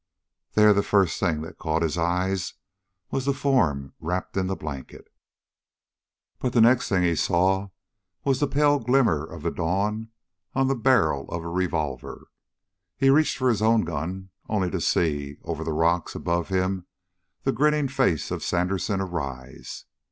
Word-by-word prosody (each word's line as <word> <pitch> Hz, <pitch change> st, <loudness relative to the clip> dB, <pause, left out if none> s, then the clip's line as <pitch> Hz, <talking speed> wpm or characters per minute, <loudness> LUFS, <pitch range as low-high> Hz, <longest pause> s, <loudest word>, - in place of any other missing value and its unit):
There 105 Hz, 0 st, +6 dB
the 100 Hz, -, +2 dB
first 100 Hz, -4 st, +2 dB
thing 80 Hz, -5 st, 0 dB
that 80 Hz, +1 st, -10 dB
caught 80 Hz, 0 st, 0 dB
his 80 Hz, -1 st, 0 dB
eyes 90 Hz, +2 st, -1 dB, 0.6 s
was 135 Hz, -, -1 dB
the 140 Hz, -1 st, +1 dB
form 85 Hz, -, +1 dB
wrapped 90 Hz, +3 st, -3 dB
in 95 Hz, -1 st, 0 dB
the 95 Hz, -, -1 dB
blanket. 70 Hz, -6 st, -8 dB, 1.3 s
But 125 Hz, -1 st, -2 dB
the 120 Hz, -, +4 dB
next 120 Hz, +2 st, +4 dB
thing 95 Hz, -3 st, +2 dB
he 85 Hz, -1 st, +3 dB
saw 95 Hz, +4 st, +1 dB, 0.5 s
was 135 Hz, -2 st, +1 dB
the 145 Hz, -, +2 dB
pale 145 Hz, +1 st, +3 dB
glimmer 120 Hz, -, +2 dB
of -, -, -9 dB
the -, -, 0 dB
dawn 105 Hz, +6 st, -1 dB, 0.5 s
on 135 Hz, 0 st, +3 dB
the 135 Hz, -, +2 dB
barrel 80 Hz, -, +2 dB
of 85 Hz, -1 st, -4 dB
a -, -, -6 dB
revolver. 80 Hz, -7 st, -3 dB, 0.7 s
He 135 Hz, 0 st, +4 dB
reached 155 Hz, +2 st, +3 dB
for 130 Hz, -, +1 dB
his 110 Hz, -3 st, +1 dB
own 110 Hz, 0 st, +4 dB
gun, 90 Hz, +3 st, -4 dB, 0.2 s
only 95 Hz, -5 st, 0 dB
to -, -, -2 dB
see, 75 Hz, -4 st, 0 dB
over -, -, -4 dB
the 80 Hz, -, -2 dB
rock 85 Hz, +2 st, +1 dB
above 85 Hz, 0 st, -1 dB
him, 95 Hz, -1 st, -1 dB, 0.6 s
the -, -, +2 dB
grinning 150 Hz, +3 st, +2 dB
face 130 Hz, -, 0 dB
of -, -, -3 dB
Sandersen 95 Hz, +2 st, 0 dB
arise. 70 Hz, -8 st, -6 dB
95 Hz, 160 wpm, -25 LUFS, 80-115 Hz, 1.3 s, There